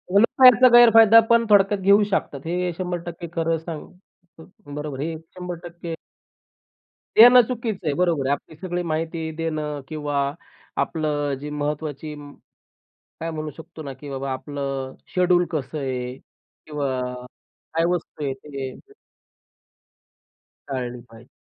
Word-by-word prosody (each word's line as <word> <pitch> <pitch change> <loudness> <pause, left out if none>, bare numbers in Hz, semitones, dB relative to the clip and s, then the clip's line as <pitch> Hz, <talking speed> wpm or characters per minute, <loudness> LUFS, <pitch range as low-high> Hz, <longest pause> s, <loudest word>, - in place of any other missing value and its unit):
ऑनलाईनच्याही 250 +3 +7
गैरफायदा 225 -1 +8
पण 235 0 +4
थोडक्यात 200 -1 +4
घेऊ 200 +2 +5
शकतात. 145 -7 -1
हे 180 +1 -1
100% 175 -2 -5
खरं 165 -1 0
सांग 160 -1 -7 0.5
हं, 170 -3 -13
बरोबर 150 -2 -5
आहे. 155 +4 -2
हे 160 - -6 0.2
100% 175 -2 -7 1.2
देणं 245 +2 +9
चुकीचं 225 -8 -4
आहे. 145 - +2
बरोबर 170 -6 +1
आहे. 140 - +1
आपली 145 +2 -7
सगळी 175 +1 -3
माहिती 160 0 -3
देणं 155 -3 -3
किंवा 145 -2 -2 0.5
आपलं 150 -3 -1
जी 145 +2 -6
महत्वाची 150 0 -4
म 145 -1 -11 0.9
काय 165 +1 -3
म्हणू 155 -1 -4
शकतो 160 -1 -10
ना, 140 -2 -6
की 140 +2 -11
बाबा 135 0 -4
आपलं 135 0 -4 0.2
शेड्यूल 180 -1 +3
कसं 155 -1 -3
आहे 125 -2 -3
किंवा 145 0 -7 0.8
काय 165 +1 +2
वस्तू 160 -3 -5
आहे 135 - -1
ते. 135 - -9 1.7
टाळली 125 -2 -4
पाहिजे. 115 +2 -16
160 Hz, 130 wpm, -23 LUFS, 145-180 Hz, 1.7 s, देणं